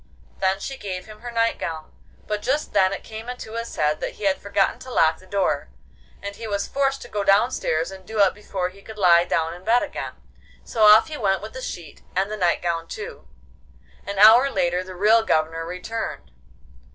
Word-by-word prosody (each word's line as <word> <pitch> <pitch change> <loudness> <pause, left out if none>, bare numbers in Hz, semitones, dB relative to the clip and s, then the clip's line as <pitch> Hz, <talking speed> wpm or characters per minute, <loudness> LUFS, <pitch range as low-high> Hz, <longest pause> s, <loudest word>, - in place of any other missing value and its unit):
Then 190 0 +1
she 270 +6 -5
gave 185 -3 -5
him 215 -1 -12
her 240 +2 -7
night 230 -1 0
gown, 160 -1 -5 0.3
but 210 -1 -3
just 285 +6 -1
then 185 0 +4
it 195 - -5
came 220 +2 -8
into 250 -3 -7
his 230 0 -5
head 150 0 +1
that - - -4
he - - -12
had 195 -1 +1
forgotten 200 -1 0
to 260 - -10
lock 160 -9 +3
the 185 - -18
door, 185 - 0 0.5
and 200 0 -5
he 225 +1 -7
was 200 -1 -2
forced 275 0 0
to - - -10
go 205 -3 -2
downstairs 195 -5 +2
and 190 -1 -11
do 220 +4 -7
it 195 - +5
before 190 -3 -4
he 195 +2 -17
could 220 +2 -11
lie 175 -3 +5
down 165 -2 0
in 175 +1 -12
bed 230 +4 +3
again. - - -5 0.5
So 225 - -4
off 210 +1 +8
he 310 -2 -6
went 195 -4 0
with 220 - -8
the 260 - -7
sheet, 170 - -7
and 195 +3 0
the - - -2
night 180 -4 +1
gown 165 -1 -1
too. 445 +2 -8 0.8
An 200 0 -6
hour 225 +7 +8
later 180 -6 0
the 185 0 -10
real 215 +5 +5
Governor 165 -4 0
returned. 180 +6 -5
200 Hz, 215 wpm, -23 LUFS, 180-225 Hz, 0.8 s, off